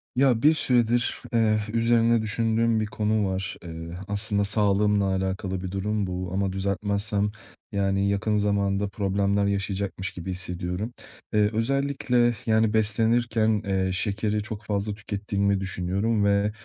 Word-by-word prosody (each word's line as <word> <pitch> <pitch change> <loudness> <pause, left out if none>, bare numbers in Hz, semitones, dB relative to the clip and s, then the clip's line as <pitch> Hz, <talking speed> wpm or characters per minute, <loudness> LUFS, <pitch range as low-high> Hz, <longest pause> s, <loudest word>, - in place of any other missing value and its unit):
Ya, 130 -3 +3
bir 155 +4 +6
süredir, 120 -4 +1
eee, 110 -2 +3 0.2
üzerine 115 0 +3
düşündüğüm 115 +1 +1
bir 110 - 0
konu 105 0 0
var. 95 0 -3
Eee, 85 0 -7
aslında 100 0 0
sağlığımla 105 0 +2
alakalı 95 0 -2
bir 95 - -4
durum 100 +1 -1
bu 90 0 -4
ama 95 0 0
düzeltmezsem, 100 +1 -1 0.4
yani, 100 -1 +1
yakın 105 +2 0
zamanda 100 -1 +1
problemler 100 0 0
yaşayacakmış 100 -1 -2
gibi 90 +1 -6
hissediyorum. 90 +4 -3 0.4
Iıı, 105 -1 +4
özellikle, 125 0 +1
yani, 110 -1 +2
beslenirken, 110 0 +2
eee, 95 -1 0
şekeri 105 +2 -1
çok 110 -1 -6
fazla 105 0 -1
tükettiğimi 100 -1 -1
düşünüyorum 95 +4 -1
ve, 100 +1 +2
100 Hz, 130 wpm, -25 LUFS, 100-110 Hz, 0.4 s, bir